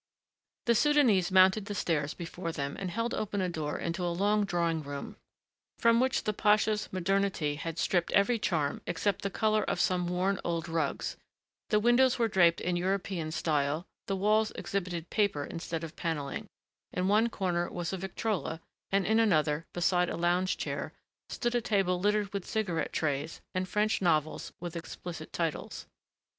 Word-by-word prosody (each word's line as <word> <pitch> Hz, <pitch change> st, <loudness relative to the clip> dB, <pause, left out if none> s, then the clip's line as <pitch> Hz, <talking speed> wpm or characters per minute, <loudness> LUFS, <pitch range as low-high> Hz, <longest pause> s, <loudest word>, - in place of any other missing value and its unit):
The 235 Hz, -, +4 dB
Soudanese 235 Hz, -9 st, +4 dB
mounted 190 Hz, +2 st, +5 dB
the 205 Hz, -1 st, -5 dB
stairs 150 Hz, -5 st, 0 dB
before 170 Hz, 0 st, -5 dB
them 140 Hz, -3 st, -3 dB
and 190 Hz, -, -3 dB
held 230 Hz, +6 st, -2 dB
open 210 Hz, -1 st, -2 dB
a 185 Hz, -, +1 dB
door 155 Hz, -4 st, -3 dB
into 170 Hz, +2 st, -3 dB
a 175 Hz, -, +1 dB
long 205 Hz, +4 st, +2 dB
drawing 170 Hz, -3 st, 0 dB
room 145 Hz, -1 st, -6 dB, 0.6 s
from 230 Hz, 0 st, +4 dB
which 260 Hz, 0 st, +1 dB
the 215 Hz, -, 0 dB
pasha's 210 Hz, 0 st, +2 dB
modernity 185 Hz, -4 st, 0 dB
had 165 Hz, +2 st, -5 dB
stripped 175 Hz, -1 st, +1 dB
every 220 Hz, +4 st, +3 dB
charm 160 Hz, -8 st, 0 dB
except 190 Hz, +3 st, 0 dB
the 200 Hz, -, -1 dB
color 215 Hz, +1 st, +2 dB
of -, -, -2 dB
some 180 Hz, -1 st, +1 dB
worn 185 Hz, +2 st, 0 dB
old 170 Hz, -1 st, -2 dB
rugs; 165 Hz, -4 st, -2 dB, 0.5 s
the 210 Hz, -, +4 dB
windows 240 Hz, +3 st, +4 dB
were 235 Hz, -2 st, +2 dB
draped 175 Hz, -5 st, +4 dB
in 180 Hz, 0 st, -1 dB
European 185 Hz, -2 st, -1 dB
style, 155 Hz, 0 st, 0 dB, 0.2 s
the 195 Hz, -, 0 dB
walls 215 Hz, +3 st, +3 dB
exhibited 175 Hz, -4 st, -3 dB
paper 200 Hz, -9 st, +1 dB
instead 165 Hz, +1 st, -5 dB
of 165 Hz, -1 st, -7 dB
paneling; 150 Hz, -5 st, -3 dB, 0.4 s
in 180 Hz, +1 st, -1 dB
one 215 Hz, +4 st, +4 dB
corner 175 Hz, -5 st, -1 dB
was 175 Hz, +1 st, -4 dB
a -, -, -1 dB
Victrola 190 Hz, -3 st, -2 dB, 0.3 s
and 195 Hz, -1 st, +2 dB
in 220 Hz, +2 st, +3 dB
another, 160 Hz, -7 st, +2 dB
beside 175 Hz, 0 st, +2 dB
a -, -, -3 dB
lounge 175 Hz, +2 st, +1 dB
chair, -, -, -4 dB, 0.4 s
stood 240 Hz, -1 st, -1 dB
a 240 Hz, -, +2 dB
table 195 Hz, -5 st, +1 dB
littered 205 Hz, +1 st, +1 dB
with 200 Hz, -2 st, -4 dB
cigarette 195 Hz, -7 st, -1 dB
trays 150 Hz, 0 st, -2 dB
and 185 Hz, 0 st, -2 dB
French 210 Hz, +2 st, +1 dB
novels 155 Hz, -4 st, +1 dB
with 175 Hz, -1 st, -6 dB
explicit 165 Hz, -1 st, -7 dB
titles. 165 Hz, -3 st, -3 dB
185 Hz, 170 wpm, -30 LUFS, 165-210 Hz, 0.6 s, mounted